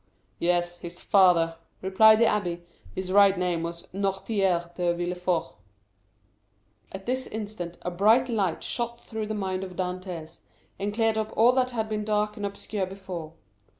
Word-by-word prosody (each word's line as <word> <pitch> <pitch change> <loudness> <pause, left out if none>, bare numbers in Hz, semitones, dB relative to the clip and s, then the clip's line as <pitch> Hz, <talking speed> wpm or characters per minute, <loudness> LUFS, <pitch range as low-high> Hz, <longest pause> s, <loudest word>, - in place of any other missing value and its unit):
"Yes, 175 0 +1
his 175 0 -7
father," 170 -4 +4 0.2
replied 215 +3 +6
the - - +7
abbé; 180 -6 0 0.3
"his 185 0 -3
right 200 -1 +6
name 180 -2 0
was 170 0 -5
Noirtier 195 -3 0
de 175 -1 0
Villefort." 180 0 -1 1.4
At 190 0 -8
this 260 +1 -1
instant 205 -5 -5
a 180 - -2
bright 220 +8 +4
light 200 -8 -1
shot 235 0 -3
through 220 -2 -5
the 215 - -3
mind 190 -2 -2
of 185 -1 -8
Dantès, 180 -3 -5 0.4
and 200 +1 -1
cleared 225 0 +1
up 215 - -3
all 230 +3 +7
that 255 0 +2
had 225 -3 -2
been 215 -1 -2
dark 210 0 0
and 205 -1 -2
obscure 200 -1 -4
before. 185 -5 -7
190 Hz, 155 wpm, -27 LUFS, 175-215 Hz, 1.4 s, the